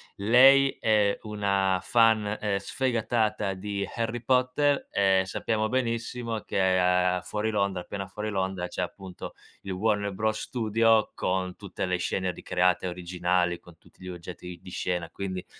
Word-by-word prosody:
lei 135 +6 +6
è 105 -2 +3
una 100 -3 0
fan, 110 -3 +3
ehm, 100 -2 0
sfegatata 110 -2 -1
di 100 +1 -4
Harry 115 0 -2
Potter, 130 +3 +2
ehm, 95 -1 +3
sappiamo 110 +3 -1
benissimo 115 -2 -2
che 100 - -3 0.2
a 90 0 +2
fuori 105 +3 -2
Londra 100 -3 0
appena 95 +1 -6
fuori 105 +3 -5
Londra 95 -2 -2
c'è 90 - -4
appunto 95 +1 -7 0.3
il 95 - -6
Warner 100 0 0
Bros. 110 +2 -1
Studio 115 -1 +2
con 90 0 -2
tutte 100 -2 -5
le 90 0 0
scene 90 +1 -1
ricreate 90 0 0
originali, 90 0 -1
con 85 -2 -17
tutti - - -24
gli 90 - -7
oggetti 90 0 -8
di 95 - -12
scena, 90 -2 -3
quindi 95 -2 -5
100 Hz, 145 wpm, -27 LUFS, 90-110 Hz, 0.3 s, lei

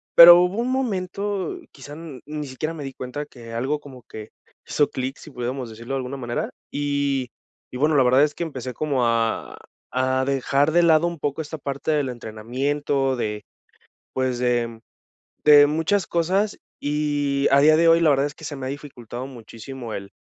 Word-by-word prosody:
Pero, 175 +1 +12
hubo 180 +4 0
un 245 +2 0
momento, 200 -6 -2
quizá, 145 - -11
n 150 -5 -9
ni 150 -1 -5
siquiera 155 +5 -4
me 155 - -7
di 135 -1 -6
cuenta 130 +4 -6
que 115 -4 -12
algo 135 +6 -1
como 135 -4 -12
que 110 -1 -9 0.4
hizo 145 - +2
clic, 130 +2 -4
si - - -12
pudiéramos 125 -1 -4
decirlo 115 +4 -7
de - - 0
alguna 130 +1 -4
manera, 120 -2 -3 0.2
y, 140 -3 -1 0.4
y 125 - -6
bueno 150 +3 +2
la 135 - +6
verdad 130 +3 +5
es 150 -1 +1
que - - -10
empecé 130 -6 -5
como 135 -2 0
a 115 -1 0 0.4
a 130 0 +1
dejar 140 +2 +1
de 175 +2 +4
lado 165 -1 +5
un 170 -2 -3
poco 145 +1 -2
esta 155 +1 -7
parte 140 +2 -3
del 145 -3 +1
entrenamiento. 130 +4 -2
De 105 -3 -3 0.7
pues, 130 -2 0
de 120 -2 0 0.7
de 145 -1 +9
muchas 165 +6 0
cosas, 190 +5 0 0.2
y 145 -1 0
a 140 +1 +6
día 155 +1 +6
de 165 +1 +4
hoy 165 0 +6
la 165 - +5
verdad 140 -1 +3
es 145 +1 -5
que - - -16
se 150 -1 -5
me 130 - -5
ha - - -3
dificultado 130 -4 -7
muchísimo 120 0 -9
el 100 -1 -7
140 Hz, 190 wpm, -23 LUFS, 125-155 Hz, 0.7 s, Pero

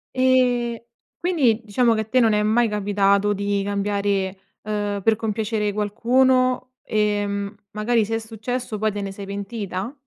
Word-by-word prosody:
Ehm, 250 -2 +2 0.4
quindi 275 -11 +2
diciamo 230 +3 +2
che 220 - 0
a - - -5
te 255 +4 +2
non 225 -3 +4
è 210 - +2
mai 225 +3 +3
capitato 205 0 +2
di 200 0 -1
cambiare, 200 -1 -1 0.3
ehm, 205 -1 -2
per 225 +2 +4
compiacere 215 -1 -1
qualcuno, 255 +5 +2
ehm, 205 -1 -1 0.2
magari 220 +1 +1
se 225 +2 -2
è - - +1
successo 225 +1 -4
poi 215 +1 +1
te 205 0 -4
ne 200 -1 -4
sei 200 +1 -8
pentita? 200 +1 -4
215 Hz, 155 wpm, -22 LUFS, 200-235 Hz, 0.4 s, non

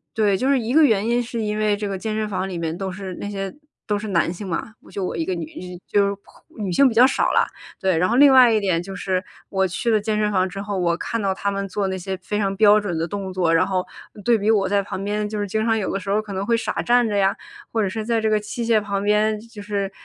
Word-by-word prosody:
对， 210 -3 +3
就 255 +8 0
是 275 -2 +3
一 230 +2 -2
个 315 +2 +6
原 220 -6 +3
因， 240 +1 +2
是 235 0 -5
因 210 -1 -1
为 210 -1 +2
这 205 0 -3
个 195 - -3
健 215 +1 -3
身 215 0 -1
房 195 -1 -3
里 180 - -4
面 165 -1 -3
都 190 +1 -4
是 190 0 -6
那 205 - -4
些， 195 -2 -4 0.3
都 210 -2 -1
是 215 - -6
男 170 -3 +1
性 195 +2 -7
嘛， 185 +6 -4
我 - - -18
就 195 - -3
我 - - -3
一 165 - -1
个 185 +2 -2
女 170 -2 -4 0.4
就 200 -1 +2
是 200 - -3 0.4
女 200 -4 -3
性 270 +10 +5
比 230 - -5
较 240 +3 +8
少 265 - +1
啦。 - - +4 0.3
对， 190 -2 +1
然 180 +3 +2
后 240 - +1
另 275 0 +7
外 255 -2 +8
一 220 - +3
点 185 -4 0
就 195 +2 -8
是 185 0 -1 0.3
我 190 -1 +1
去 210 +6 -1
了 215 -1 +3
健 215 +1 -1
身 210 0 +1
房 185 -1 +1
之 195 +2 -7
后， 205 -2 -3
我 170 -1 +1
看 230 +4 -3
到 195 -1 +1
他 200 +1 -2
们 200 0 -3
做 195 +1 -1
那 190 - -2
些 190 +1 -4
非 205 +3 -3
常 195 -1 0
标 210 0 +6
准 195 -5 -3
的 165 +1 -1
动 195 0 -5
作， 175 -3 +1
然 165 - +3
后 185 -2 -1 0.4
对 240 - +5
比 210 0 0
我 205 -3 +3
在 200 +1 +2
旁 195 0 -6
边 210 +1 -2
就 210 0 -4
是 205 - -1
经 215 +2 -1
常 225 0 +2
有 205 - -2
的 195 - -1
时 195 +1 -7
候 205 - +2
可 215 -2 -6
能 190 +1 -2
会 230 +2 +2
傻 - - -2
站 240 0 +3
着 210 - -2
呀， 195 -1 +2 0.4
或 225 -2 +1
者 200 - +1
是 215 +3 -4
在 230 +1 0
这 220 -1 0
个 215 - +3
器 220 +3 -5
械 225 -2 +3
旁 200 -1 -2
边， 210 +1 +2
就 230 -2 -11
是， 200 -1 -3
205 Hz, 320 characters per minute, -22 LUFS, 190-220 Hz, 0.4 s, 较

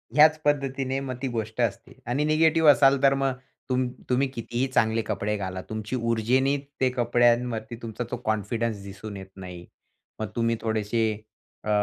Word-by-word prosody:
ह्याच 155 +1 +7
पद्धतीने 135 -2 0
मग 130 -2 -4
ती 135 - -1
गोष्ट 110 -1 -3
असते. 115 +2 -3
आणि 125 +5 0
निगेटिव्ह 160 +1 +4
असाल, 135 -1 +4
तर 135 0 +6
मग 135 -1 +1 0.4
तुम्ह 130 -1 +1 0.2
तुम्ही 130 +2 +2
कितीही 120 0 -2
चांगले 115 -3 +2
कपडे 105 -1 -2
घाला. 95 -2 -4
तुमची 110 +2 -4
ऊर्जेने 125 +4 +2 0.2
ते 130 - +4
कपड्यांवरती 120 -1 +2
तुमचा 115 +1 -4
तो 125 - -2
कॉन्फिडन्स 110 0 -1
दिसून 100 +1 -8
येत 95 0 -9
नाही. 90 -2 -9 0.5
मग 110 - -2
तुम्ही 115 0 +1
थोडेसे 110 0 0 0.7
अ, - - -1
120 Hz, 155 wpm, -26 LUFS, 110-135 Hz, 0.7 s, ह्याच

